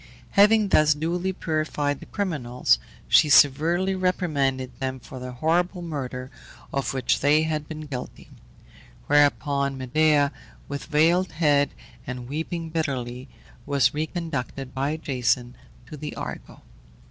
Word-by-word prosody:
Having 210 +1 +5
thus 150 -4 +4
duly 175 +5 -1
purified 155 -4 -2
the - - -12
criminals, 130 - 0 0.3
she 150 - +5
severely 160 +7 +4
reprimanded 150 -9 0
them 130 -1 -3
for 130 +1 -10
the 125 0 -7
horrible 175 +7 0
murder 130 -5 -5 0.4
of 140 0 -1
which 130 - +1
they 150 +3 +4
had 155 -2 -2
been 155 -1 -6
guilty; 140 -5 -7 0.8
whereupon 140 -1 +2
Medea, 145 +2 +2 0.4
with 140 -1 -5
veiled 170 +5 +2
head, 145 -3 +3 0.4
and 125 -1 -6
weeping 160 +3 -4
bitterly, 130 -5 -3 0.4
was 140 -1 +3
reconducted 150 -4 -4
by 140 +4 -1
Jason 125 -4 -1 0.3
to 135 - -9
the 150 0 -6
Argo. - - -7
145 Hz, 125 wpm, -25 LUFS, 135-160 Hz, 0.8 s, Having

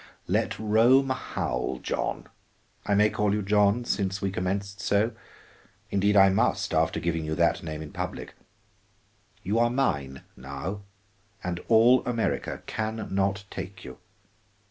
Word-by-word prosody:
"Let - - 0
Rome 115 +6 +4
howl, 65 - -2
John, - - -3 0.6
I 100 - +3
may 105 +1 +4
call 105 -1 +1
you 105 - -1
John, 105 +3 +3
since 95 -3 -1
we 100 -2 -2
commenced 100 +2 -3
so? 100 +4 +2 0.8
Indeed 100 +1 +2
I 95 0 +8
must, 95 0 +1
after 80 0 +1
giving 80 -1 -1
you 80 0 -2
that 85 0 +2
name 80 -1 -5
in 75 - -10
public. - - -5 1.1
You 105 +5 0
are 120 0 +4
mine 70 - -1
now, 70 +10 -6 0.6
and 90 -1 -3
all 120 +3 +5
America 120 -2 -2
can 110 -1 -4
not 100 0 0
take 95 -1 -7
you. 65 - -10
100 Hz, 140 wpm, -27 LUFS, 85-110 Hz, 1.1 s, I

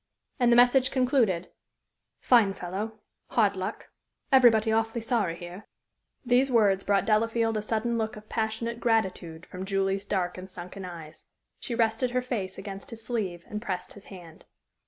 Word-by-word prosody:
And 245 -1 +4
the - - +6
message 250 +2 +5
concluded: 245 -9 +1 0.7
"Fine 220 -6 +4
fellow. 205 +5 -5 0.3
Hard - - +2
luck. - - -5 0.4
Everybody 235 -4 +5
awfully 225 +1 0
sorry 220 -7 0
here." 175 +4 -10 0.6
These 250 +2 +3
words 205 -5 +3
brought 200 -1 +2
Delafield 225 +1 +1
a 215 - 0
sudden 230 +2 -1
look 220 0 -2
of 215 0 -12
passionate 225 +2 -2
gratitude 185 -8 -1
from 185 +1 -7
Julie's 195 0 -1
dark 185 -3 -2
and 185 +1 -9
sunken 185 +2 -8
eyes. 165 -4 -10 0.3
She 235 - -4
rested 230 +2 +1
her 250 +1 0
face 205 -7 -4
against 195 -1 -8
his 225 -1 -9
sleeve 190 -8 -3
and 210 0 -5
pressed 185 -6 -4
his 205 - -14
hand. 175 -4 -13
215 Hz, 155 wpm, -27 LUFS, 190-235 Hz, 0.7 s, the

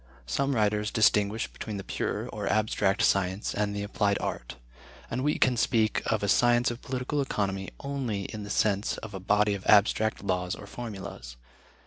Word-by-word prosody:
Some 135 - 0
writers 105 -1 +1
distinguish 105 -1 +3
between 105 -2 -7
the 100 - -5
pure, - - -3
or - - -3
abstract 105 0 +1
science, 95 0 +1
and 105 0 -1
the 100 - -2
applied 100 -1 +1
art, - - -4 0.6
and 125 +3 -1
we 150 +1 +1
can 125 -1 +3
speak 115 -2 +2
of 110 -2 0
a - - +1
science 120 +3 +4
of 120 - -7
political 130 +3 -2
economy 100 -7 -2
only 130 -8 -3
in 110 +2 -6
the 105 - -7
sense 105 0 +1
of 110 -2 -8
a 95 - -5
body 105 +2 +2
of 100 -1 -5
abstract 110 +1 +4
laws 90 -2 -1
or - - -10
formulas. 95 - -8
105 Hz, 175 wpm, -28 LUFS, 100-115 Hz, 0.6 s, science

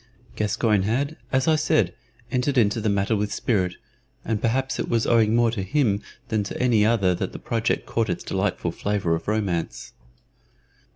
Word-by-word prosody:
Gascoyne 105 0 +1
had, 135 +10 -1 0.2
as 130 0 +1
I 160 - +5
said, 100 - +2 0.4
entered 130 +2 0
into 110 -1 +3
the 110 - +1
matter 100 +2 +1
with 105 0 -1
spirit, 95 -7 0 0.5
and 110 -2 -1
perhaps 130 +3 0
it - - -2
was 115 -1 +1
owing 115 -2 +3
more 120 -1 +3
to 110 -4 -3
him 100 0 +1 0.3
than 110 -2 +1
to - - -6
any 120 -4 +3
other 105 -5 +3
that - - -3
the - - -6
project 115 -1 -1
caught 115 -3 -1
its 90 - -2
delightful - - -1
flavor 100 -5 -1
of 80 0 -3
romance. 100 -6 -2
110 Hz, 175 wpm, -24 LUFS, 100-120 Hz, 0.5 s, I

